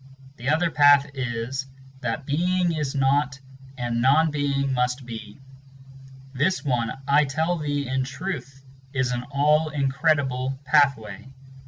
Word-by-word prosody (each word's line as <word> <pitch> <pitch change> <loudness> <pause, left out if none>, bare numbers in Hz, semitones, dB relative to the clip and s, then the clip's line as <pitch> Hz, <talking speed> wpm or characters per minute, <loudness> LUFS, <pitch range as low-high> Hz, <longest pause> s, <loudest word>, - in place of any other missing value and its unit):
Th' 125 -1 -8
other 165 +2 +2
path 145 -1 +5
is: 130 0 -3 0.3
That 125 +2 -3
Being 180 +4 +1
is 150 -4 -3
not, 140 +1 +1 0.4
and 120 -1 -2
Non 150 +5 +4
Being 140 -2 0
must 125 +1 -1
be; 115 -2 -8
Parmenides. 135 0 -20 0.2
This 155 +7 0
one, 120 -4 0 0.2
I 145 +1 +4
tell 160 +5 -1
thee 145 -2 -2
in 130 +1 0
truth, 135 -2 -6 0.3
is 130 -2 0
an 120 -1 -2
all 150 +3 +2
incredible 135 -2 0
pathway. 135 -6 +1
135 Hz, 135 wpm, -24 LUFS, 130-150 Hz, 0.4 s, path